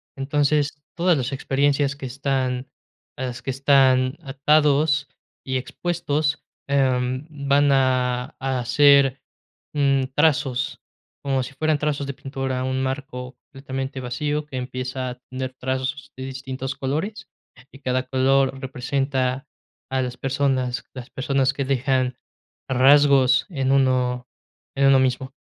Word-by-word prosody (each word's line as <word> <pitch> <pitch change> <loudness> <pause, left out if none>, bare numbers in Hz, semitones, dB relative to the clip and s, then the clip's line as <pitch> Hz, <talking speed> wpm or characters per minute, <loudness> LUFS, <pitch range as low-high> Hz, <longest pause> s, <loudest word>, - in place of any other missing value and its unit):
Entonces, 145 +1 0
todas 175 -1 +3
las 130 0 -2
experiencias 140 +1 +1
que 140 - -8
están 130 -1 -2 0.5
las 125 -2 -4
que - - -6
están 130 0 +3
atados 145 +1 +2 0.4
y 130 0 -1
expuestos, 150 +1 -2 0.2
em, 130 -1 +1 0.2
van 140 0 +4
a, 125 -2 +1
a 135 -1 -1
hacer, 140 +1 +5 0.5
mm, 140 -2 +2
trazos, 145 -4 +1 0.4
como 135 -1 +1
si 125 - -8
fueran 155 +2 +1
trazos 145 -2 -1
de 140 - -3
pintura, 135 -1 -3
un 130 0 -1
marco 130 -1 -5 0.2
completamente 135 -1 -5
vacío, 145 +5 -2
que 140 -3 -7
empieza 130 0 -4
a 125 - -11
tener 130 0 -4
trazos 130 +2 -3
de 130 - -5
distintos 130 0 -5
colores, 160 +11 -3 0.4
y 135 - -14
cada 130 -1 -1
color 135 +1 +2
representa 130 0 -2 0.4
a 130 0 +1
las 125 -1 -4
personas, 130 -2 0
las 125 -2 -9
personas 135 0 +1
que 140 - -2
dejan 130 -1 0 0.5
rasgos 135 0 +5
en 135 -5 -1
uno 125 -2 +2 0.5
en 140 0 +4
uno 135 -1 +6
mismo. 130 +1 0
135 Hz, 125 wpm, -23 LUFS, 130-140 Hz, 0.5 s, uno